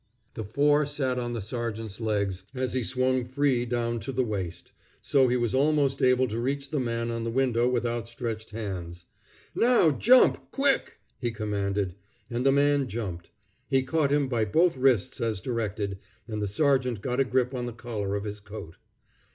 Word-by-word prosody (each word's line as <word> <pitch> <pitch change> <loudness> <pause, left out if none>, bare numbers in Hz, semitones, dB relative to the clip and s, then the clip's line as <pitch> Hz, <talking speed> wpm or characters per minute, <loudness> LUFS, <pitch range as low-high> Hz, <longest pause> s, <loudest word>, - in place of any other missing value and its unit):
The 110 - -5
four 145 +7 +2
sat 130 -3 -1
on 120 -1 -3
the 115 -4 -3
sergeant's 115 -1 -4
legs 100 -4 -1
as 130 -1 -2
he 130 - +1
swung 130 +2 +1
free 130 -1 +1
down 120 -1 -1
to 110 +6 -5
the 130 0 +1
waist; 95 -7 -4 0.3
so 135 -2 +3
he 125 +1 +2
was 120 -3 0
almost 140 0 +2
able 130 0 +4
to 110 +2 -3
reach 140 +3 -2
the 150 - 0
man 115 -1 -1
on 115 0 -3
the 115 - -2
window 125 -1 +2
with 125 -1 0
outstretched 115 -1 -3
hands. 90 -6 -6 0.5
"Now 235 -9 +4
jump 245 - +4
quick!" 275 0 +1 0.2
he 120 - -1
commanded; 100 -3 -2 0.4
and 120 +1 -1
the 135 - +5
man 140 0 +3
jumped. 95 -7 -5 0.4
He 135 -1 +2
caught 145 +2 +1
him 145 -1 +2
by 120 -4 0
both 165 - +3
wrists 130 -2 +2
as 110 -4 -1
directed, 105 -3 -3 0.3
and 105 -2 -4
the 105 - 0
sergeant 125 -1 +1
got 125 0 -1
a - - +5
grip 130 0 0
on 125 -1 -3
the - - -4
collar 110 -4 -4
of 100 - -2
his 105 0 -5
coat. 100 -5 -10
120 Hz, 185 wpm, -27 LUFS, 110-130 Hz, 0.5 s, the